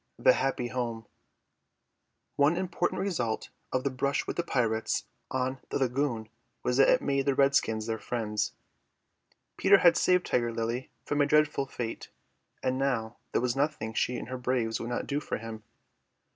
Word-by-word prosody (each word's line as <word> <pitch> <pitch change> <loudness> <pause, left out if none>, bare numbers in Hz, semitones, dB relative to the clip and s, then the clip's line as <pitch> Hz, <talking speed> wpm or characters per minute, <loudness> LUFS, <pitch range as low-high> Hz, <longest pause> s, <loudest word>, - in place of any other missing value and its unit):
THE - - +6
HAPPY 130 -2 -1
HOME 120 -3 -3 1.3
One 145 +4 +4
important 175 -1 -1
result 125 - -1 0.2
of 130 0 0
the 140 - 0
brush 140 +2 0
on 130 -1 -1
the - - 0
lagoon 125 -3 0 0.4
was 125 0 +1
that 135 - +6
it - - +4
made 140 0 0
the 140 - +3
redskins 130 -6 +2
their 110 -1 -2
friends. 105 -3 -2 1.0
Peter 200 - +6
had 175 -3 +6
saved 180 0 +3
Tiger 120 -1 +1
Lily 115 +3 -2 0.2
from 145 0 +1
a 145 - +4
dreadful 150 -2 +3
fate, 120 -3 -5 0.5
and 130 +1 0
now 120 -5 -1
there - - +1
was 125 -1 0
nothing 135 -6 -1
she 125 +2 0
and 120 - -7
her 130 0 -4
braves 120 -3 0
would 115 - -4
not 120 - -2
do 145 0 -1
for - - -3
him. 110 -1 -7
130 Hz, 160 wpm, -29 LUFS, 115-140 Hz, 1.3 s, THE